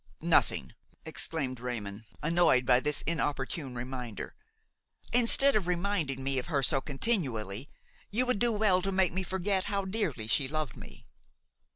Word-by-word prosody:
"Nothing!" - - +1 0.3
exclaimed 135 -6 -2
Raymon, 110 -4 -5 0.2
annoyed 165 -6 +3
by 125 0 +5
this 150 +1 0
inopportune 145 -3 -2
reminder. 125 -2 -6 0.8
"Instead 245 +3 +6
of 200 -5 +1
reminding 175 -7 -1
me 135 -1 0
of 125 - -6
her 145 -5 0
so 135 +1 +3
continually, 135 - -2 0.4
you 240 +5 +1
would 250 -5 0
do 240 +1 +2
well 205 -4 +2
to 195 - -2
make 185 -2 +2
me 190 - -1
forget 190 +1 -1
how 200 -1 -2
dearly 185 - -2
she 130 +5 +1
loved 155 -5 -3
me!" - - -13
155 Hz, 150 wpm, -30 LUFS, 130-190 Hz, 0.8 s, Instead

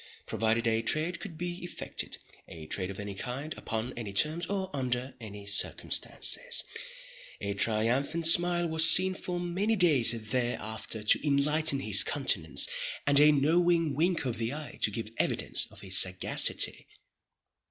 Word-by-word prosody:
Provided 115 +1 0
a 115 -1 +1
trade 155 +9 0
could 180 -7 -8
be 175 +2 -5
effected—a 85 - -7
trade 90 +4 -3
of 100 - -7
any 100 -1 -5
kind, 130 +9 -5
upon 115 +3 -4
any 115 -4 -6
terms, 155 - 0
or 190 -1 -3
under 130 -1 -2
any 105 -2 -9
circumstances—a 100 0 -3
triumphant 120 +10 0
smile 175 +1 +3
was 160 0 +4
seen 185 +1 +4
for 180 -1 -4
many 185 +6 -1
days 120 - +3
thereafter 115 -3 -3
to 110 +7 +2
enlighten 145 +1 +2
his 105 -4 +5
countenance, 110 - +1 0.4
and 140 0 +4
a 150 +1 +7
knowing 165 +2 +2
wink 165 +2 0
of 120 -3 -3
the 115 +1 -2
eye 150 +1 -8
to - - +3
give 110 +1 -5
evidence - - -1
of - - -14
his 95 -1 +5
sagacity. 95 0 +1
135 Hz, 140 wpm, -29 LUFS, 110-165 Hz, 0.4 s, a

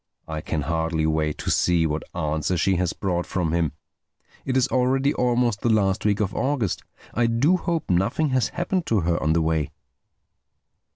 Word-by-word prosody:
I 80 -1 -4
can 80 -1 -2
hardly 80 0 0
wait 80 -1 0
to - - -2
see 85 -2 +3
what 75 0 -1
answer 80 +2 -1
she 95 +2 +2
has 90 -1 0
brought 90 -2 -2
from 85 -4 -1
him. 85 -4 +1 0.7
It 130 0 0
is 130 0 +3
already 130 +2 +2
almost 120 -3 +1
the 120 - +1
last 100 -4 +2
week 105 0 +2
of 105 -2 -1
August. 130 -8 -1 0.3
I 120 0 +2
do 120 +10 +3
hope 170 -3 -2
nothing 95 - +1
has 130 -3 +2
happened 175 0 -2
to 110 -4 +2
her 85 0 0
on 75 +1 +2
the 85 0 +2
way." 80 -2 0
95 Hz, 180 wpm, -24 LUFS, 80-125 Hz, 0.7 s, see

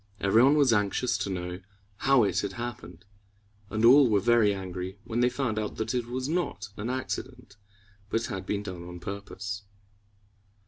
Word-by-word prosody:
Every 100 +4 +4
one 140 +3 +5
was 140 -5 +5
anxious 105 +4 +1
to - - -2
know 90 -1 -4 0.4
how 135 0 +4
it 95 -2 +1
had 100 -1 -3
happened; 105 -7 -7 0.6
and 110 +1 +1
all 130 +1 +8
were 105 -2 +4
very 115 0 +4
angry 95 0 -5
when 115 +1 -3
they 120 0 +4
found 125 -5 -1
out 105 -1 -3
that 110 - -2
it 120 -2 -1
was 130 +2 -3
not 150 - -2
an 110 +4 -4
accident, 125 -3 -5 0.5
but 115 +2 0
had 95 -6 -5
been 105 0 -1
done 90 -4 -6
on 90 0 -8
purpose. 100 +1 -6
105 Hz, 175 wpm, -28 LUFS, 95-125 Hz, 0.6 s, all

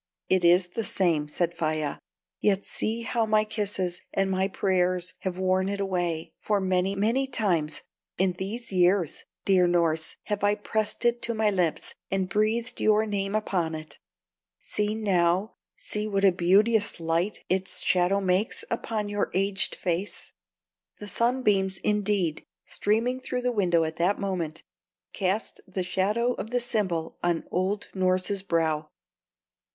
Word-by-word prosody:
"It 185 -1 +3
is 180 +1 +5
the 225 - -3
same." 170 -7 +1
said 170 +3 -1
Faia, 155 -3 -2 0.4
"yet 200 -2 +1
see 225 +2 -2
how 230 -1 0
my 215 0 +4
kisses 200 -4 -3
and 195 0 +1
my 190 0 +1
prayers 185 -2 0
have 185 -1 -3
worn 185 0 +1
it 200 0 -3
away; 175 -4 -1
for 210 -1 +1
many, 190 0 +1
many 230 +7 +1
times 175 - 0 0.3
in 185 -1 +2
these 225 +5 -4
years, 180 -2 +2 0.2
dear 185 -2 +4
Norss, 165 -2 +1
have 205 -1 -3
I 205 0 +4
pressed 215 +2 -2
it 240 0 +2
to 235 - -2
my 215 -1 +2
lips 180 -5 0 0.2
and 190 -1 0
breathed 215 +4 0
your 215 0 +4
name 200 -1 -2
upon 180 -6 0
it. 155 0 -9 0.6
See 210 +1 -1
now 190 -1 +1 0.2
see 210 0 -3
what 200 -1 +1
a 195 - +7
beauteous 200 +4 +3
light 165 +5 -1
its 185 +1 0
shadow 185 +2 +3
makes 190 +2 0
upon 220 -2 -2
your 205 0 -1
aged 195 0 +1
face!" 180 +3 -3 0.6
The 210 - -8
sunbeams, 210 -5 +1
indeed, 205 -6 0 0.2
streaming 230 +5 0
through 250 -1 -3
the 250 - +1
window 175 -7 +2
at 160 0 -4
that 180 +4 +1
moment, 175 -6 -3 0.5
cast 195 +3 -1
the 185 0 -3
shadow 210 +7 +1
of 220 - -6
the 245 +1 +1
symbol 200 -9 -1
on 175 -1 0
old 190 +3 -1
Norss's 185 +1 +1
brow. 160 -4 0
195 Hz, 150 wpm, -27 LUFS, 180-210 Hz, 0.6 s, a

